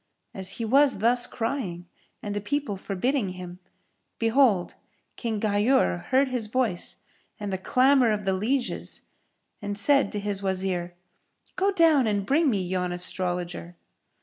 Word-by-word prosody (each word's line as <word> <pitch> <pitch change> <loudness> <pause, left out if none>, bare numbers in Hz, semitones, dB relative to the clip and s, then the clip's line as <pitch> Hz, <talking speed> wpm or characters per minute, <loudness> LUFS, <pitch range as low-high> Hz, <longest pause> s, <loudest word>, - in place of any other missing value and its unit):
As 190 0 0
he 230 - -4
was 275 +4 +4
thus 240 +4 +2
crying 225 -8 -4 0.4
and 205 - -3
the 205 - -3
people 270 0 -2
forbidding 200 +2 -2
him, 180 -1 -9 0.6
behold, 225 -5 +2 0.4
King 225 -3 -3
Ghayur 205 - +1
heard 265 +2 +3
his 250 -4 -2
voice 225 -6 -1 0.4
and 205 -2 -4
the 190 - -2
clamour 255 +4 +4
of 210 -2 -2
the 190 - +1
lieges 245 +7 -2 0.6
and 205 0 -4
said 275 +1 +3
to 205 - -2
his 200 -1 -3
Wazir, 185 -2 -2 0.6
"Go 395 +2 +2
down 320 - +4
and 205 -2 0
bring 295 +6 +3
me 200 -6 0
yon 180 0 -2
Astrologer." 175 -1 -2
205 Hz, 145 wpm, -26 LUFS, 185-255 Hz, 0.6 s, was